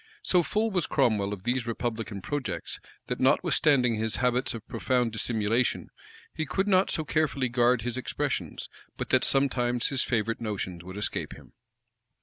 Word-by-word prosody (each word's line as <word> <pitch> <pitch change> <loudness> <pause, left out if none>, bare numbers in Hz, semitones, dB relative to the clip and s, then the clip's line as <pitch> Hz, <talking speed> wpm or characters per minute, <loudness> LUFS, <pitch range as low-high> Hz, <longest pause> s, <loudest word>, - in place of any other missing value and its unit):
[*] - - -35
So 180 - +4
full 215 +6 0
was 180 -5 0
Cromwell 110 -7 +2
of 100 -3 -6
these 120 +1 -1
republican 115 -4 -3
projects, 145 -3 -4 0.3
that, - - -4
notwithstanding 125 -5 +3
his 110 0 0
habits 125 0 +1
of 110 - -9
profound 125 0 0
dissimulation, 115 +2 0 0.4
he 160 - -2
could 195 +6 -1
not 190 -1 +4
so 160 - -1
carefully 140 -4 0
guard 120 -1 +3
his 120 0 -3
expressions, 130 - -3 0.3
but - - -4
that - - +4
sometimes 125 -3 +2
his 135 -2 +2
favorite 115 -1 0
notions 95 -5 -4
would 95 +2 -8
escape 105 - -2
him. - - -16
120 Hz, 160 wpm, -28 LUFS, 110-140 Hz, 0.4 s, So